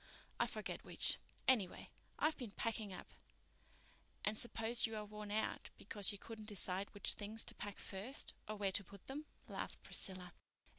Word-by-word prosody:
I -, -, +5 dB
forget -, -, -3 dB
which. -, -, +4 dB, 0.3 s
Anyway, 215 Hz, -9 st, +4 dB, 0.3 s
I've 310 Hz, +1 st, +4 dB
been 245 Hz, -6 st, -4 dB
packing 220 Hz, -1 st, 0 dB
up." 185 Hz, -, -7 dB, 1.1 s
"And 210 Hz, -, +3 dB
I -, -, +5 dB
suppose 235 Hz, 0 st, +4 dB
you 225 Hz, -, -4 dB
are 210 Hz, -1 st, -2 dB
worn 210 Hz, 0 st, -5 dB
out 215 Hz, +1 st, +1 dB
because 205 Hz, -1 st, 0 dB
you 205 Hz, -, -5 dB
couldn't 215 Hz, +1 st, -7 dB
decide 195 Hz, -1 st, 0 dB
which 205 Hz, -, +4 dB
things 215 Hz, +2 st, +1 dB
to -, -, -4 dB
pack 205 Hz, -1 st, -4 dB
first, 205 Hz, +8 st, -2 dB
or 215 Hz, -, -1 dB
where 200 Hz, -2 st, +2 dB
to 200 Hz, -, +3 dB
put 200 Hz, +1 st, -12 dB
them," 290 Hz, +3 st, -4 dB, 0.2 s
laughed -, -, -4 dB
Priscilla. 185 Hz, -2 st, 0 dB
210 Hz, 170 wpm, -41 LUFS, 200-225 Hz, 1.1 s, I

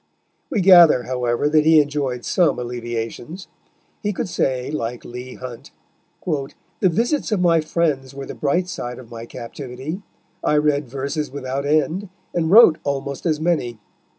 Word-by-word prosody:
We 230 Hz, -9 st, 0 dB
gather, 175 Hz, -8 st, +7 dB
however, 125 Hz, +1 st, 0 dB
that 155 Hz, 0 st, +4 dB
he 160 Hz, 0 st, +6 dB
enjoyed 140 Hz, -4 st, -1 dB
some 170 Hz, -8 st, +2 dB
alleviations. 120 Hz, -, -5 dB, 0.5 s
He 210 Hz, -, -1 dB
could -, -, -3 dB
say, 130 Hz, -6 st, -1 dB
like 120 Hz, -5 st, -4 dB
Leigh 125 Hz, +1 st, -8 dB
Hunt, 125 Hz, +1 st, -9 dB, 0.6 s
"the 155 Hz, +3 st, -2 dB
visits 235 Hz, -, 0 dB
of 210 Hz, -, +1 dB
my 170 Hz, -2 st, +4 dB
friends 150 Hz, -5 st, -1 dB
were 140 Hz, 0 st, -6 dB
the -, -, -7 dB
bright 175 Hz, +5 st, 0 dB
side 125 Hz, -8 st, -5 dB
of 125 Hz, -2 st, -13 dB
my 115 Hz, 0 st, -8 dB
captivity; 130 Hz, -, -7 dB, 0.4 s
I 150 Hz, -, +2 dB
read 150 Hz, -2 st, +1 dB
verses 140 Hz, +4 st, -3 dB
without 140 Hz, 0 st, -4 dB
end, 155 Hz, +6 st, +1 dB, 0.2 s
and 165 Hz, -2 st, 0 dB
wrote 195 Hz, -5 st, +7 dB
almost 140 Hz, +2 st, -3 dB
as 155 Hz, -2 st, +1 dB
many." 155 Hz, -8 st, 0 dB
145 Hz, 150 wpm, -21 LUFS, 125-165 Hz, 0.6 s, gather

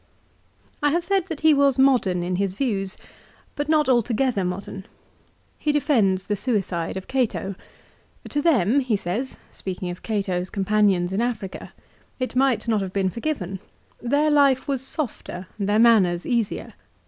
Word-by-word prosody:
2 295 Hz, -, +3 dB
I -, -, +4 dB
have 340 Hz, +4 st, 0 dB
said 385 Hz, 0 st, 0 dB
that 325 Hz, -5 st, -6 dB
he 315 Hz, 0 st, +6 dB
was 280 Hz, -2 st, +3 dB
modern 245 Hz, -10 st, +3 dB
in 180 Hz, +1 st, -1 dB
his 195 Hz, -1 st, -1 dB
views, 200 Hz, -6 st, -1 dB, 0.6 s
but 290 Hz, +1 st, -3 dB
not 305 Hz, -2 st, +3 dB
altogether 240 Hz, -3 st, +1 dB
modern. 190 Hz, +1 st, -5 dB, 0.7 s
He 300 Hz, -, +1 dB
defends 225 Hz, -, +2 dB
the 210 Hz, -, -1 dB
suicide 190 Hz, -7 st, -1 dB
of 190 Hz, -, -7 dB
Cato. 245 Hz, -6 st, -1 dB, 0.4 s
" -, -, -18 dB
To 290 Hz, -, 0 dB
them," 275 Hz, -, +3 dB
he 250 Hz, -6 st, 0 dB
says, 205 Hz, +9 st, -4 dB
speaking 185 Hz, -1 st, -5 dB
of 175 Hz, -, -9 dB
Gate's 190 Hz, -4 st, -2 dB
companions 195 Hz, -3 st, +1 dB
in 200 Hz, -, 0 dB
Africa, 225 Hz, -6 st, -4 dB, 0.2 s
" -, -, -35 dB
it -, -, -15 dB
might 260 Hz, -3 st, +2 dB
not 220 Hz, -3 st, +2 dB
have 190 Hz, -1 st, -5 dB
been 190 Hz, -2 st, +1 dB
forgiven. 210 Hz, -, -3 dB, 0.4 s
Their 290 Hz, +5 st, +2 dB
life 280 Hz, -3 st, +4 dB
was 275 Hz, -3 st, -1 dB
sbfter 255 Hz, -, -5 dB
and 200 Hz, 0 st, -1 dB
their 210 Hz, -, +3 dB
manners 205 Hz, -7 st, +4 dB
easier. 235 Hz, -4 st, -1 dB
225 Hz, 165 wpm, -23 LUFS, 190-275 Hz, 0.7 s, he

